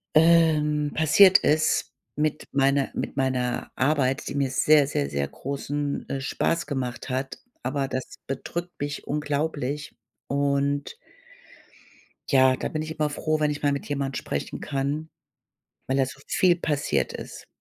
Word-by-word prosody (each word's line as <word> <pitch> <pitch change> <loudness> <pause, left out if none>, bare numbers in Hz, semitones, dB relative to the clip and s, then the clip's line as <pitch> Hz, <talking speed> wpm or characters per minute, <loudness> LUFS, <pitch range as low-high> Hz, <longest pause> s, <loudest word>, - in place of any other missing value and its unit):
ähm 155 -2 +4
passiert 180 +5 +7
ist 155 +1 +1 0.2
mit 155 0 -1
meiner 140 0 +2
mit - - -3
meiner 130 -2 -1
Arbeit, 135 -1 +1
die - - -4
mir 140 -2 +1
sehr, 145 +2 +4
sehr, 70 - -1
sehr 70 0 -1
großen, 140 - -4
äh, 135 - -2
Spaß 165 +4 0
gemacht 125 -4 -4
hat, 130 0 -3 0.3
aber 135 +1 -1
das 130 -1 -5
bedrückt 170 +6 -4
mich 145 0 -4
unglaublich 150 -1 -2 0.3
und 140 - 0 1.4
ja, 130 -1 +5
da - - -3
bin 155 0 -3
ich 155 - -6
immer 150 - +2
froh, 155 +1 -1
wenn 150 -1 +2
ich 145 0 -4
mal 145 - +3
mit 140 +1 -4
jemand 140 -2 -2
sprechen 70 - -4
kann, 140 +3 -2 0.8
weil 130 - 0
da 135 - +4
so 130 - -8
viel 180 -2 +3
passiert 140 - 0
ist. - - -8
140 Hz, 145 wpm, -25 LUFS, 135-150 Hz, 1.4 s, passiert